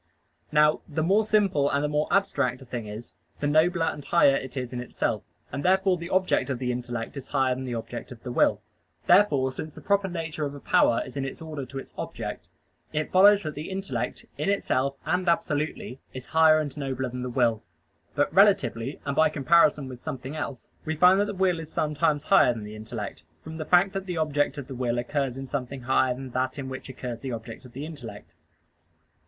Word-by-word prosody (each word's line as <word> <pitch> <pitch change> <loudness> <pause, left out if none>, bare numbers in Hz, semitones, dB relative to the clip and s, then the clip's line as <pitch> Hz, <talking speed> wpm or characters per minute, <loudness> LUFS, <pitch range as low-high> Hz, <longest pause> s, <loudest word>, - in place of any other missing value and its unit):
Now 150 0 +4
the 155 +1 -1
more 200 +6 +4
simple 200 -10 +2
and 140 +1 0
the - - +1
more 150 +1 0
abstract 140 -10 +1
a - - -14
thing 120 -3 -5
is, 105 0 -8 0.3
the - - -2
nobler 165 +3 +3
and 150 - -3
higher 140 -4 +4
it 130 0 -5
is 125 -1 -4
in 125 - -3
itself; 125 - -2 0.3
and 140 +2 -4
therefore 190 0 +3
the 170 0 -7
object 185 -5 +1
of 130 - -1
the 125 0 -1
intellect 120 +1 -4
is 135 - -7
higher 130 -2 +2
than 130 +1 -5
the 125 -2 -3
object 120 +3 -6
of 120 -2 -11
the 125 - -5
will. 105 -3 +2 0.4
Therefore, 150 -9 +4
since 155 +3 -7
the - - -9
proper 200 0 +1
nature 165 -4 -4
of 145 -1 -3
a - - -8
power 115 - +3
is 130 +2 -9
in 135 - -1
its 135 - -5
order 155 -5 -6
to 135 - -8
its 135 - -8
object, - - -6 0.4
it 155 0 -2
follows 200 +2 +6
that 155 - -4
the 150 +3 -6
intellect 145 - -4
in 150 - 0
itself 140 -9 0
and 180 0 +1
absolutely 150 -5 -1 0.2
is 130 -1 -7
higher 160 -1 +5
and 145 -3 -4
nobler 135 -3 -3
than 125 +1 -6
the 125 - -3
will. 120 -3 +1 0.5
But - - +1
relatively 190 - +3
and 140 - -2
by 160 +1 +5
comparison 150 -1 +3
with 125 -2 -9
something 130 +3 -6
else, 140 -5 -5 0.2
we 160 0 -2
find 180 +4 +6
that 205 - +3
the 205 -1 -5
will 185 -2 +2
is 160 -1 -8
sometimes 150 -1 0
higher 155 -11 +5
than 110 - -6
the 105 +1 -8
intellect, 110 -5 -6 0.2
from 160 0 -8
the 155 - -4
fact 180 +4 +4
that 195 0 -4
the 180 -2 -3
object 145 -2 0
of 140 - -5
the 135 - -8
will 120 -1 -1
occurs 130 +1 -1
in 135 - -5
something 135 0 -4
higher 130 0 +2
than 130 0 -8
that 130 +2 -1
in 135 -2 -5
which 130 0 -7
occurs 125 -2 -6
the 130 0 -5
object 115 +2 -8
of 125 - -14
the 140 +3 -5
intellect. 120 -10 -9
140 Hz, 220 wpm, -26 LUFS, 125-160 Hz, 0.5 s, follows